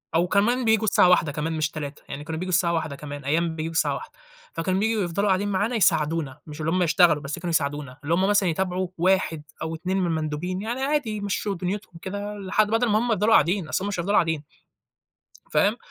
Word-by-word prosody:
أو 175 +2 +3
كمان 235 +6 +2
بييجوا 220 0 +3
الساعة 185 -3 +4
13:00 155 -5 +4
كمان 155 +3 -3
مش 155 -1 -1
15:00، 145 -2 -6
يعني 145 +1 -6
كانوا 160 0 -5
بييجوا 185 0 -3
الساعة 170 -1 +3
13:00 160 -3 -2
كمان، 145 -1 -8
أيام 160 +2 0
بييجوا 160 +1 -3
الساعة - - +2
13:00، - - -8 0.4
فكانوا 185 +3 -1
بييجوا 220 -1 +1
يفضلوا 200 +4 -1
قاعدين 195 +1 +2
معانا 205 +5 0
يساعدونا، 155 -7 +1
مش 150 +1 -9
اللي 160 +1 0
هُم 180 0 +2
يشتغلوا 165 -2 +4
بس 150 +5 -4
كانوا 175 0 -4
يساعدونا، 145 -4 -1
اللي 160 +4 0
هُم 190 +3 +2
مثلًا 205 -3 +3
يتابعوا 185 +2 -1
1 175 -3 +1 0.2
أو 160 0 -3
2 185 +4 -2
من 185 - +1
المندوبين، 160 +4 -2
يعني 240 +4 -3
عادي 285 -4 0
يمشّوا 200 0 -2
دنيتهم 185 +2 -4
كده 205 +2 -5
لحد 200 +2 +1
بَدَل 225 +2 +1
ما 210 +1 +3
هُم 240 - -1
يفضلوا 215 +2 +3
قاعدين، 175 +2 +3
أصل 185 - -1
هُم - - -2
مش 185 - -3
هيفضلوا 200 +4 0
قاعدين. 160 -3 +2 1.1
فاهم؟ - - +3
180 Hz, 215 wpm, -25 LUFS, 160-205 Hz, 1.1 s, الساعة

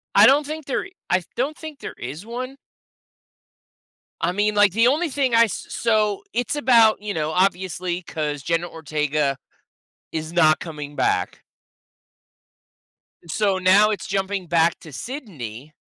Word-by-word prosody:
I - - +8
don't 285 +2 +4
think 310 0 -6
there 270 - -2 0.2
I 185 - +4
th 180 - -7
don't 275 +6 -1
think 315 -3 -9
there - - -7
is 145 +10 -7
one. 255 +3 -6 1.6
I 175 - +1
mean, 205 +2 0
like, 205 -1 +5
the 230 +2 +4
only 310 +5 +2
thing 265 -3 +1
I 230 0 +7
s 210 - -5
so, 215 -3 +1
it's 245 +5 -1
about, 230 -7 +5
you 210 -1 -4
know, 155 -2 -1
obviously, 185 -1 0
'cause 150 -3 -3
Jenna 170 +4 -1
Ortega 150 -3 -1 0.8
is 160 0 -4
not 155 -3 +4
coming 150 -3 -7
back. - - 0 1.9
So, 195 +3 +1
now 190 +3 +5
it's 210 - -3
jumping 195 -1 -2
back 165 0 +2
to 160 - -11
Sydney, 150 - -7
190 Hz, 145 wpm, -22 LUFS, 160-230 Hz, 1.9 s, I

